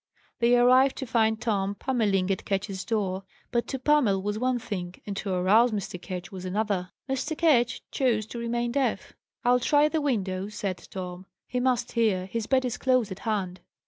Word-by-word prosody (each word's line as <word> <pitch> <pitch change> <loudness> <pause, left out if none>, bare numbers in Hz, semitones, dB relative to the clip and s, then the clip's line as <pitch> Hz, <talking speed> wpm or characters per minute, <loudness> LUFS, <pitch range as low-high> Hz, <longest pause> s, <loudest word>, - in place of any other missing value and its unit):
They 240 +1 +4
arrived, 255 +2 +5
to 265 - -4
find 220 -2 +2
Tom 200 -4 -1
pummelling 200 -7 +1
at 190 - -2
Ketch's 195 -1 -2
door. 195 -4 -1 0.3
But 235 -1 0
to 270 - -3
pummel 260 -7 +3
was 210 +1 -2
one 255 +1 +1
thing, 195 -7 -5
and 200 - -4
to 195 - -3
arouse 200 +7 +4
Mr. 195 -4 -4
Ketch 185 +1 -6
was 185 -2 -7
another. 190 -1 -1 0.2
Mr. 270 +4 -2
Ketch 255 -7 +3
chose 235 -6 +1
to 235 - -7
remain 235 0 -1
deaf. 270 +1 -1 0.3
"I'll 250 0 +5
try 290 +4 +4
the 315 0 0
window," 195 -9 -1
said 200 -3 -3
Tom, 185 0 -7 0.2
"He 250 - -2
must 245 -2 +1
hear; 215 -6 +1
his 215 +3 -4
bed 260 -1 +2
is 245 - -2
close 255 -5 +2
at 190 - -6
hand." 195 -5 -2
220 Hz, 185 wpm, -27 LUFS, 195-250 Hz, 0.3 s, arrived